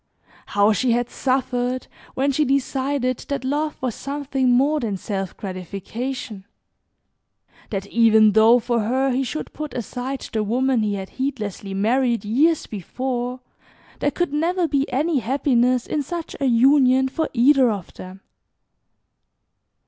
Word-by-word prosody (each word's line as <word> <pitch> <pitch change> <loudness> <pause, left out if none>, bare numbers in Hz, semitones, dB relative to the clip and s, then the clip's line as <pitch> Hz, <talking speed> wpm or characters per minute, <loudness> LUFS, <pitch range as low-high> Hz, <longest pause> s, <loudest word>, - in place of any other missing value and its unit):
How 205 +1 +3
she 240 +4 +1
had 240 0 -1
suffered 255 -1 -1 0.3
when 275 +2 +1
she 300 +3 +1
decided 270 -1 0
that 280 -2 -2
love 300 +3 -1
was 250 -3 -1
something 275 -1 -2
more 280 +5 +3
than 215 -6 -2
self 195 -1 -4
gratification, 200 +4 -6 1.2
that 195 -2 -3
even 220 0 +5
though 220 +3 +6
for 240 0 0
her 260 +5 +1
he 255 +2 0
should 305 +4 -5
put 305 -1 -6
aside 250 +3 -4
the 220 -1 0
woman 250 +3 +1
he 210 -1 0
had 190 -1 -6
heedlessly 210 -7 -3
married 235 +3 +1
years 295 +9 +2
before, 250 +5 -4 0.6
there 290 - +1
could 325 +1 -2
never 340 +3 +1
be 280 -3 0
any 295 +3 +1
happiness 250 -1 +1
in 300 - -1
such 335 +3 -6
a 280 - 0
union 260 +1 +4
for 315 +4 -2
either 260 +1 +4
of 200 -5 -5
them. 185 +1 -11
255 Hz, 140 wpm, -22 LUFS, 220-275 Hz, 1.2 s, though